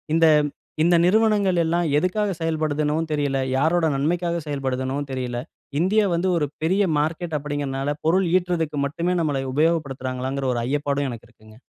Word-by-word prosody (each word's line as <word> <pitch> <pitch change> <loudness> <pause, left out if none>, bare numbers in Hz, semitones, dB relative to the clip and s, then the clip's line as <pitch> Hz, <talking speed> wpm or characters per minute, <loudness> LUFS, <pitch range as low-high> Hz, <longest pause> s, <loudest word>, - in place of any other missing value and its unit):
இந்த 165 0 +5 0.6
இந்த 170 +2 +4
நிறுவனங்கள் 205 -2 +3
எல்லாம் 170 +1 +1
எதுக்காக 190 +6 0
செயல்படுதுன்னு 155 -2 0 0.2
தெரியல. 145 -2 0 0.2
யாரோட 165 +4 +2
நன்மைக்காக 170 +4 0
செயல்படுதுன்னும் 135 0 -2
தெரியல. 125 -2 -3 0.4
இந்தியா 205 +5 +3
வந்து 170 +2 0
ஒரு 150 - +1 0.2
பெரிய 185 +6 +2 0.2
மார்க்கெட் 160 +2 -2
அப்டின்கிறதுனால 145 -1 -3
பொருள் 180 +3 +3
ஈட்றதுக்கு 170 -5 0
மட்டுமே 170 +5 -1
நம்மல 145 -4 -1
உபயோகப்படுத்துறாங்களாங்கிற 135 -4 -1
ஒரு 120 - -1
ஐயப்பாடும் 145 +1 -1
எனக்கு 120 -1 -8
இருக்குங்க. 110 -1 -18
150 Hz, 135 wpm, -23 LUFS, 135-175 Hz, 0.6 s, இந்த